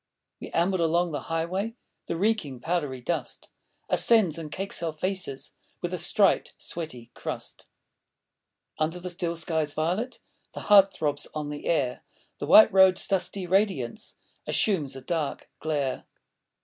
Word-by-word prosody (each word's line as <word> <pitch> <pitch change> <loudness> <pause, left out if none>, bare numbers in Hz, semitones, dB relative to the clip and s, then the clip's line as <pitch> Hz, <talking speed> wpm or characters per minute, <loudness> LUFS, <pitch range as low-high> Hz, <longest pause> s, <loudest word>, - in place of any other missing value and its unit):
We - - -8
amble 175 +2 +1
along 170 +1 +2
the 145 0 -5
highway; 185 +7 -2 0.3
The - - -2
reeking, 180 - 0
powdery 145 -4 -2
dust 170 +7 -4 0.4
Ascends 200 -9 +3
and 155 -2 -7
cakes 195 0 -3
our 165 -2 -2
faces 185 -4 -3 0.3
With 175 +1 -4
a 180 - -1
striped, 195 +4 +2
sweaty 125 -8 -7
crust. - - -6 1.1
Under 160 +3 0
the 180 0 -4
still 170 -1 -3
sky's 160 -2 -1
violet 185 +11 -1 0.4
The - - -5
heat 200 -2 +7
thróbs 145 -4 -2
on 150 -1 -3
the 145 - -6
air.... 135 -7 0 0.4
The - - -4
white 220 -1 +8
road's 190 -1 +5
dusty 195 0 0
radiance 185 - 0 0.3
Assumes 155 -11 +1
a 135 - -8
dark 155 +1 -3
glare. 145 -4 -2
170 Hz, 140 wpm, -27 LUFS, 150-190 Hz, 1.1 s, white